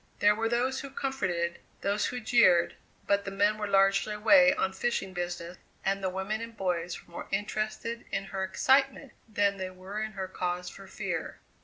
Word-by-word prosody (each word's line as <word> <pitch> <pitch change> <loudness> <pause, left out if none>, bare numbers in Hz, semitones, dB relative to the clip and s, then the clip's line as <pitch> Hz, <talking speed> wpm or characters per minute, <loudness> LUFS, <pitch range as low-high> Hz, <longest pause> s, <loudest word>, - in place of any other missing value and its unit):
There 205 0 +5
were 225 +1 -1
those 255 +3 0
who 275 - -6
comforted, 185 -12 -2 0.2
those 200 +1 +1
who 250 - -4
jeered, 220 -7 +4 0.3
but 200 0 +2
the 195 - -4
men 205 +2 +2
were 210 - -2
largely 195 +2 +3
away 270 +6 +6
on 190 -9 0
fishing 195 -2 -2
business, 175 -1 -4 0.3
and 195 0 0
the 190 - +1
women 190 +4 -3
and 230 -1 -8
boys 180 -2 -2
were - - -22
more - - -7
interested 215 +3 -2
in - - -1
her 195 0 -4
excitement 270 +6 +2 0.2
than 200 -1 +1
they 185 -1 -4
were 185 +3 -6
in 215 0 -4
her 190 -2 -4
cause 180 -1 -3
for 195 - -12
fear. 190 -5 -4
200 Hz, 185 wpm, -29 LUFS, 185-225 Hz, 0.3 s, away